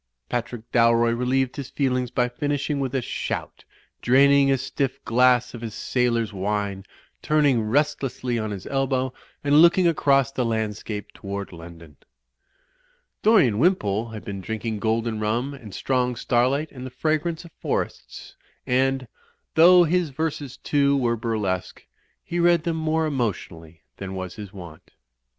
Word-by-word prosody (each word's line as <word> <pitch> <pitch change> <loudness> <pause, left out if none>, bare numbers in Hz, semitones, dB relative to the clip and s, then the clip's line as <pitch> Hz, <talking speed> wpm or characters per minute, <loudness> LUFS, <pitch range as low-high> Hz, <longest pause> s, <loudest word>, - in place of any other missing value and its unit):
Patrick 120 -1 -3
Dalroy 115 0 +4
relieved 130 +1 0
his 140 -3 -5
feelings 125 -3 0
by 125 0 +1
finishing 145 +3 -2
with 135 -1 -2
a 130 - 0
shout, - - -5 0.4
draining 140 +2 +5
a 135 - +3
stiff 135 +1 -2
glass 125 +1 +3
of 120 - -8
his 115 -3 -6
sailor's 115 -3 0
wine, 100 0 -2 0.4
turning 145 -6 +3
restlessly 130 0 -1
on 110 -1 -3
his 100 -3 -6
elbow 130 -1 -1 0.3
and 145 +1 +5
looking 170 +1 +5
across 140 -4 +2
the 130 - -1
landscape 110 -2 -3
toward 100 -1 -6
London. 85 -3 -12 1.2
Dorian 175 - +4
Wimpole 115 - +1
had 110 -1 -9
been 100 -2 -5
drinking 110 +2 -4
golden 110 +1 -1
rum 115 +6 -1
and 120 -7 -11
strong 125 +4 0
starlight 130 +6 +1
and 125 -2 -9
the 130 - -5
fragrance 155 +5 -1
of 170 - -13
forests; - - -4 0.3
and, 130 0 +1 0.5
though 175 +2 +7
his 175 0 +1
verses, 145 -2 -4
too, 140 -1 +2
were 120 -3 +1
burlesque, 105 -5 -3 0.4
he 175 0 -3
read 170 -1 +4
them 170 -1 -1
more 160 0 0
emotionally 90 - -4
than 95 -1 -6
was 95 -1 -5
his 105 -3 -9
wont. 85 -6 -12
125 Hz, 145 wpm, -24 LUFS, 110-140 Hz, 1.2 s, though